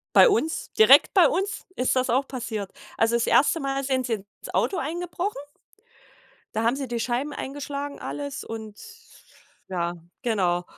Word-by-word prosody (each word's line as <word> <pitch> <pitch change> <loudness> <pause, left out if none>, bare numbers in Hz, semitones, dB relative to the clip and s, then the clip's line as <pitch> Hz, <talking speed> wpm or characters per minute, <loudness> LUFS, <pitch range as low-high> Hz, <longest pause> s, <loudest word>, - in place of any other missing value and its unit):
Bei - - +9
uns 375 -7 0
direkt 440 - +6
bei 370 -4 +7
uns 390 +7 -1
ist 255 +1 +1
das 255 0 +1
auch 265 +3 +1
passiert. 220 -6 -4 0.3
Also 225 +1 +3
das 235 - +1
1. 310 +4 +4
Mal 275 -1 -1
sind 260 -2 0
sie 240 - -3
ins 200 -1 -10
Auto 390 - +1
eingebrochen, 345 +1 -3 1.1
da 220 - -1
haben 235 +3 +2
sie 275 -2 -4
die 240 0 -2
Scheiben 250 +5 -1
eingeschlagen 285 +1 -5
alles 285 -1 -5
und 220 -2 -8 0.9
ja, 175 -2 -1 0.3
genau. 185 -7 +1
265 Hz, 155 wpm, -25 LUFS, 225-290 Hz, 1.1 s, Bei